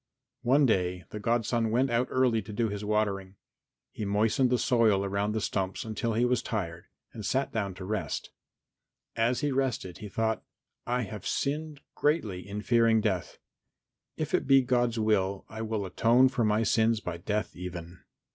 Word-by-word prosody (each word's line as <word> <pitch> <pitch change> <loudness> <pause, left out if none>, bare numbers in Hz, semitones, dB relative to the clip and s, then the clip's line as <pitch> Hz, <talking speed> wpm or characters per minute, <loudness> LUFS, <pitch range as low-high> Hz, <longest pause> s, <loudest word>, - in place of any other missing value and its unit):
One 135 +4 +4
day 90 -5 +1
the 105 - -5
godson 115 +1 +1
went 125 +3 +2
out 120 +2 +2
early 125 -3 +2
to 105 +2 -9
do 115 +1 0
his 105 0 -5
watering. 100 -2 -1 0.6
He - - -6
moistened 110 +6 +2
the 125 - +3
soil 110 -6 +3
around 100 +2 -1
the 110 - 0
stumps 95 0 -2
until 115 +1 -2
he 120 +2 +3
was 125 -1 +2
tired 85 -9 -4 0.3
and 110 - -7
sat 135 +7 0
down 100 -4 -2
to 95 - -7
rest. 105 +1 -3 0.8
As 115 +2 +1
he 145 - 0
rested 130 -9 -1
he 105 - -7
thought, 110 +2 0 0.5
"I 125 +1 0
have 105 -2 -6
sinned 150 +1 -2
greatly 105 - 0
in 105 +1 -4
fearing 115 -1 +4
death. 95 -6 -2 0.8
If - - -3
it - - +1
be 135 -1 +6
God's 120 -2 +1
will 100 -3 +1
I 110 0 -6
will 110 -2 -2
atone 120 +7 +4
for 130 -2 0
my 105 +1 +2
sins 115 0 +2
by 90 -5 -5
death 105 +5 -2
even." 90 -1 -7
110 Hz, 175 wpm, -29 LUFS, 100-120 Hz, 0.8 s, be